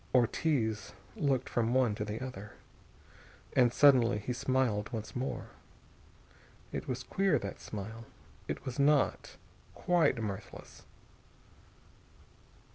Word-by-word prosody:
Ortiz 115 -4 +1 0.2
looked 140 - 0
from 120 +1 0
one 125 -5 +3
to 105 - -3
the 105 +5 -4
other. 105 -5 -8 1.0
And 125 -2 +5
suddenly 125 -5 +5
he 105 +4 -3
smiled 120 -5 0
once 110 -2 -6
more. 130 +2 -3 1.2
It - - -4
was 130 0 -3
queer, 195 -5 +2
that 100 -5 -6
smile. 110 +2 -7 0.4
It - - -5
was 130 +1 -5
not 145 0 +2 0.4
quite 170 -8 +2
mirthless. 105 -2 -7
120 Hz, 110 wpm, -32 LUFS, 110-130 Hz, 1.2 s, And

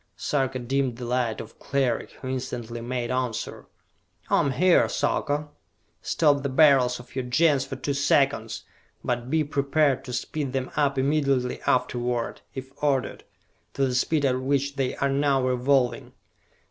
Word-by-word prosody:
Sarka 135 -3 -1
dimmed 130 0 -1
the 125 - -6
light 120 -2 -1
of - - -10
Cleric, 130 -4 -1
who 130 - -9
instantly 120 -3 -4
made 120 0 -3
answer. 125 -3 -3 0.6
"I - - +5
am - - +2
here, 180 +6 +4
Sarka!" 150 0 -1 0.5
"Stop 145 -3 +2
the 140 - -2
Beryls 130 -3 +4
of 125 +1 -14
your 130 -2 -2
Gens 140 +1 +3
for 135 - -6
two 135 +2 -2
seconds, 140 -5 +1 0.4
but 120 0 -2
be 160 +1 +2
prepared 140 -1 +1
to 125 - -6
speed 140 +2 -3
them 130 -1 -2
up 140 -2 +1
immediately 135 -2 +1
afterward, 120 -1 0
if 130 0 -7
ordered, 140 -3 0 0.5
to 135 - +2
the 130 - -1
speed 145 +3 +1
at 130 -1 +1
which 140 +1 0
they 135 -2 -1
are 140 - 0
now 140 -1 +2
revolving! 130 0 +1
135 Hz, 155 wpm, -25 LUFS, 125-140 Hz, 0.6 s, I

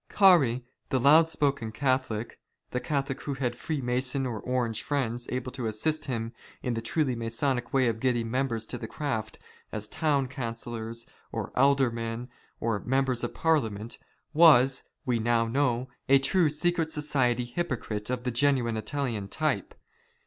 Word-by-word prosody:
Carey, 140 - +5 0.2
the 130 - +1
loud 155 +5 +6
spoken 140 -8 0
Catholic 130 -3 -1
— - - -48
the 125 - -1
Catholic 135 -1 -2
who 140 - -3
had 125 -3 -1
Freemason 130 -1 -1
or 115 -4 -3
Orange 120 -2 -1
friends 120 -4 -2
able 125 0 -3
to 125 -3 -3
assist 155 +9 -1
him 115 -2 -3 0.3
in 125 - 0
the 115 - -2
truly 130 +2 0
Masonic 120 +2 -1
way 130 -2 +3
of 115 -1 -1
getting 120 -2 0
members 120 -4 -1
of - - -4
the 110 - -4
craft 110 -6 -3 0.3
as 105 -1 -4
Town 140 0 +1
Councillors, 115 -2 -5 0.3
or - - -4
Aldermen, 125 -3 +1 0.3
or 115 -3 0
Members 130 0 0
of 120 - -3
Parliament 115 -9 0 0.2
— - - -48
was, 135 -3 +6 0.2
We 120 -2 +1
now 115 0 +2
know, 125 0 +1 0.2
a 135 - +8
true 155 +5 +3
secret 165 +2 0
society 135 -6 +1
hypocrite 120 -6 -3
of 125 -1 -2
the 125 - -1
genuine 120 -2 +2
Italian 110 -2 -2
type. 155 +8 -1
125 Hz, 155 wpm, -28 LUFS, 115-140 Hz, 0.3 s, a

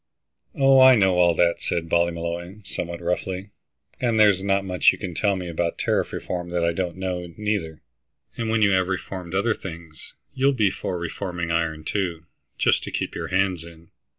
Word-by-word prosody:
"Oh, 135 -1 +5
I 130 0 +9
know 95 -4 +3
all 85 -1 +4
that," 85 +1 +2
said 85 -1 -2
Ballymolloy, 85 +3 -2
somewhat 85 -2 -5
roughly, 90 +3 -3 0.5
"and 115 -3 +1
there's 100 -3 +5
not 100 0 +1
much 90 -1 +4
you - - -7
can 90 -4 -5
tell 100 +4 +1
me 90 -1 -5
about 85 0 -2
tariff - - 0
reform 90 -1 -4
that 85 -1 0
I 85 - +1
don't 90 0 -3
know, 90 -2 -4
neither. 105 -7 -3 0.5
And 115 -1 -3
when 110 -1 +2
you 100 - +4
have 95 -1 +2
reformed 95 -1 -5
other 110 +4 +2
things, 85 -5 -10 0.2
you'll 135 +1 +2
be 105 -7 +2
for 90 - -4
reforming 85 0 -4
iron, 80 -2 -1
too, 85 -2 -2 0.3
just - - +2
to - - -6
keep - - -3
your - - -4
hands 95 -3 0
in. 85 0 -15
90 Hz, 185 wpm, -24 LUFS, 85-100 Hz, 0.5 s, I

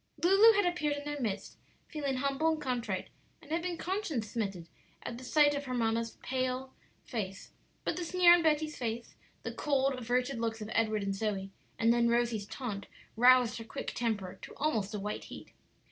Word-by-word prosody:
Lulu 395 +6 +7
had 405 -2 +3
appeared 305 -5 0
in 285 - -6
their 295 -1 -4
midst, 205 -4 -3 0.3
feeling 285 -4 -2
humble 280 +4 +1
and 315 - -4
contrite, 240 -9 -2 0.3
and 305 -2 -15
had 330 +1 +1
been 350 -1 -3
conscience 330 - -2
smitten 195 -7 -3 0.4
at 240 +1 -6
sight 290 +3 +4
of 285 0 -3
her 255 -1 -3
mamma's 230 -1 0
pale 255 0 -2 0.3
face; 195 -5 -5 0.3
but 325 - -1
the 360 - -2
sneer 355 0 +6
on 350 - +5
Betty's 310 -1 +1
face, 235 -1 -3 0.3
the - - -4
cold, 275 -2 +1
averted 250 +1 -1
looks 225 -1 -2
of 215 0 -6
Edward 215 -2 +1
and 195 0 -1
Zoe, 195 -1 -2 0.3
and 230 +1 +4
then 235 0 +3
Rosie's 235 -3 +1
taunt 205 -6 -5 0.3
roused 245 0 +5
her - - -6
quick 225 - -5
temper 205 -6 -2
to - - -10
almost 220 -9 -1
a - - -2
white 210 +1 -4
heat. - - -10
250 Hz, 185 wpm, -32 LUFS, 220-295 Hz, 0.4 s, Lulu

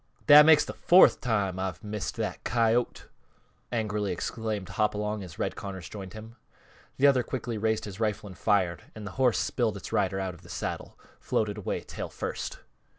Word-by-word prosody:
"That 150 +1 +9
makes 160 -2 +7
th' - - -6
fourth 180 +2 +6
time 100 -6 0
I've 95 -4 -4
missed 105 -1 -4
that - - -4
coyote!" 115 +2 +1 0.7
angrily 105 -4 -1
exclaimed 105 +1 -3
Hopalong 105 0 -1
as 85 -3 -10
Red - - -2
Connors 95 -4 -7
joined 95 -3 -8
him. 110 +2 -11 0.6
The 140 - +3
other 135 -3 +5
quickly 120 -3 -4
raised 110 0 0
his 100 -1 -8
rifle 105 -1 -1
and 95 -2 -9
fired; 95 -5 +1
and 110 -1 -8
the 105 - -6
horse, 125 -3 +4
spilling 115 -4 0
its 100 - -8
rider 95 -1 +1
out 95 -1 -3
of 85 - -15
the 85 - -16
saddle, - - -5 0.2
floated 105 -1 -1
away 100 - -3
tail - - -7
first. - - -5
105 Hz, 180 wpm, -28 LUFS, 95-115 Hz, 0.7 s, That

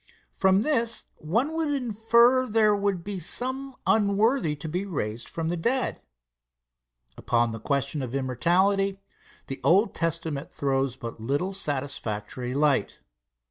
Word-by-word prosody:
From 190 +1 +3
this 235 -6 +1
one 230 - 0
would 320 -1 0
infer 245 -1 +3
there 215 -2 +3
would 200 -3 -1
be 200 0 -5
some 260 - -4
unworthy 210 - +2
to 150 +2 -7
be 180 +5 -2
raised 120 - -4
from 165 -1 -3
the 175 - 0
dead. 240 +10 -1 1.2
Upon 120 -1 +1
the 115 - -6
question 140 +3 -1
of 130 0 -4
immortality, 190 +9 +1 0.5
the 135 - -6
Old 195 +5 +4
Testament 160 -3 -2
throws 135 -2 -1
but 115 -2 -7
little 145 - -1
satisfactory 130 - -3
light. 140 -7 +1
175 Hz, 130 wpm, -26 LUFS, 140-220 Hz, 1.2 s, Old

